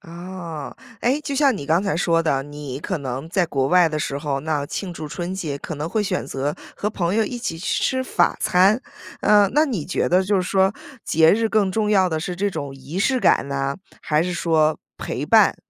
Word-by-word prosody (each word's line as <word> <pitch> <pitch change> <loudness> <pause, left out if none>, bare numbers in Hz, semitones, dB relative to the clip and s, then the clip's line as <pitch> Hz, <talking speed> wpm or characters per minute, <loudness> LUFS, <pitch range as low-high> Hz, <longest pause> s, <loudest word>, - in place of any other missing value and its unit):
啊， 170 -3 -8 0.3
诶， 260 +5 +2
就 285 -2 -3
像 275 -5 +3
你 145 - -6
刚 165 +6 +2
才 195 -4 -1
说 165 -1 +2
的， 135 -4 +1
你 145 -2 -7
可 175 +3 -3
能 135 +1 -5
在 180 -2 +2
国 135 -4 0
外 180 0 +5
的 155 -1 -3
时 140 -1 -2
候， 140 -2 -2
那 150 -1 -2
庆 180 +4 -5
祝 155 -3 -7
春 175 +4 -4
节 155 -7 -3
可 155 +2 -7
能 150 +3 -3
会 215 +5 0
选 185 -7 -2
择 140 +2 -2 0.2
和 210 - -2
朋 180 -3 -1
友 220 0 +3
一 245 - -5
起 165 -9 -4
去 185 - -1
吃 260 -1 0
法 - - +2
餐。 190 +5 +4 0.4
呃， 205 -2 +5
那 300 +1 +5
你 220 - -3
觉 185 - 0
得 185 +2 +4
就 200 +1 +1
是 185 - +1
说 190 +1 +2 0.3
节 160 +1 +5
日 225 +1 +1
更 200 -4 +1
重 215 0 0
要 190 -3 +4
的 160 -1 -2
是 180 +1 -4
这 200 +2 0
种 140 -6 -5
仪 135 +7 -7
式 255 +5 +2
感 140 - +3
呢， 135 0 -2 0.3
还 150 +1 +2
是 180 0 -2
说 160 -2 +2 0.2
陪 - - -4
伴， - - +5
175 Hz, 240 characters per minute, -22 LUFS, 150-200 Hz, 0.4 s, 外